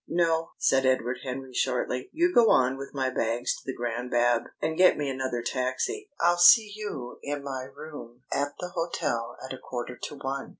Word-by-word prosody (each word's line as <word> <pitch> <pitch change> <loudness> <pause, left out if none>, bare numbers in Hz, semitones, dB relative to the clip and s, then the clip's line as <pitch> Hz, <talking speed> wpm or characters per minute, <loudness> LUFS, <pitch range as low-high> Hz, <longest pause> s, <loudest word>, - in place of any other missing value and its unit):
"No," 165 -1 +1
said 135 0 +3
Edward 130 -1 +1
Henry 130 0 -6
shortly. 125 0 -1
"You 345 +2 +2
go 235 -2 +6
on 130 +1 +4
with 135 0 -8
my 130 -2 -1
bags 115 0 0
to - - -12
the 130 - -5
Grand 120 +1 -3
Bab, 120 -1 +2
and 160 +1 -1
get 185 +2 +5
me 145 -2 -1
another 130 -2 -2
taxi. 130 - -2
I'll 175 0 +3
see 210 +4 +7
you 205 -13 -6
in 145 0 -4
my 130 -2 -4
room 135 -4 -11
at 145 +1 0
the 180 - -4
hotel 145 -9 -2
at 130 - -6
a 130 - -8
quarter 125 0 -5
to 145 - -7
one. 135 0 -4
135 Hz, 190 wpm, -27 LUFS, 125-160 Hz, -, see